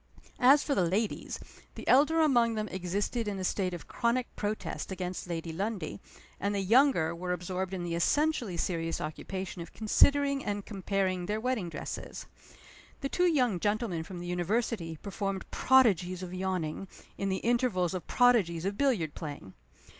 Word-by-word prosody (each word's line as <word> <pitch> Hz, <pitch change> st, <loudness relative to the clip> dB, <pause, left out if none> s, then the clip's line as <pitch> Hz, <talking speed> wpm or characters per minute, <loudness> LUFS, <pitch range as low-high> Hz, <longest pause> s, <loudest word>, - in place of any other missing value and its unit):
As 275 Hz, +4 st, +6 dB
for 285 Hz, -, 0 dB
the 225 Hz, -, +2 dB
ladies, 200 Hz, +5 st, -1 dB, 0.4 s
the -, -, -9 dB
elder 300 Hz, +5 st, +5 dB
among 240 Hz, -7 st, +4 dB
them 215 Hz, 0 st, -2 dB
existed 200 Hz, +5 st, -2 dB
in 200 Hz, -1 st, -2 dB
a 190 Hz, -, -4 dB
state 185 Hz, 0 st, 0 dB
of 175 Hz, -, -7 dB
chronic 240 Hz, +1 st, -1 dB
protest 210 Hz, -1 st, -3 dB
against 180 Hz, -1 st, -4 dB
Lady 165 Hz, -1 st, -3 dB
Lundie, 195 Hz, -1 st, -3 dB, 0.4 s
and 200 Hz, 0 st, -1 dB
the -, -, +1 dB
younger 215 Hz, -, +4 dB
were 180 Hz, +1 st, -4 dB
absorbed 180 Hz, +1 st, -3 dB
in 185 Hz, -2 st, -3 dB
the 170 Hz, -1 st, -3 dB
essentially 240 Hz, -, +1 dB
serious 165 Hz, -1 st, -1 dB
occupation 185 Hz, +4 st, -5 dB
of 170 Hz, -, -9 dB
considering 280 Hz, +5 st, +3 dB
and 205 Hz, -1 st, -3 dB
comparing 190 Hz, -3 st, -1 dB
their 210 Hz, +1 st, -1 dB
wedding 230 Hz, -7 st, -1 dB
dresses. -, -, -6 dB, 0.8 s
The 275 Hz, -, -2 dB
two 360 Hz, +4 st, +2 dB
young 250 Hz, -, +2 dB
gentlemen 205 Hz, -3 st, 0 dB
from 175 Hz, +3 st, -8 dB
the 175 Hz, -, -6 dB
University 180 Hz, -1 st, -1 dB
performed 195 Hz, -1 st, -3 dB
prodigies 190 Hz, -9 st, +3 dB
of 180 Hz, 0 st, -6 dB
yawning, 185 Hz, -2 st, -2 dB, 0.3 s
in 195 Hz, -, 0 dB
the 190 Hz, -, 0 dB
intervals 235 Hz, -7 st, +2 dB
of 180 Hz, -4 st, -5 dB
prodigies 195 Hz, -9 st, +3 dB
of 200 Hz, +1 st, -2 dB
billiard 225 Hz, -, +1 dB
playing. 145 Hz, -, -7 dB
195 Hz, 160 wpm, -30 LUFS, 175-235 Hz, 0.8 s, As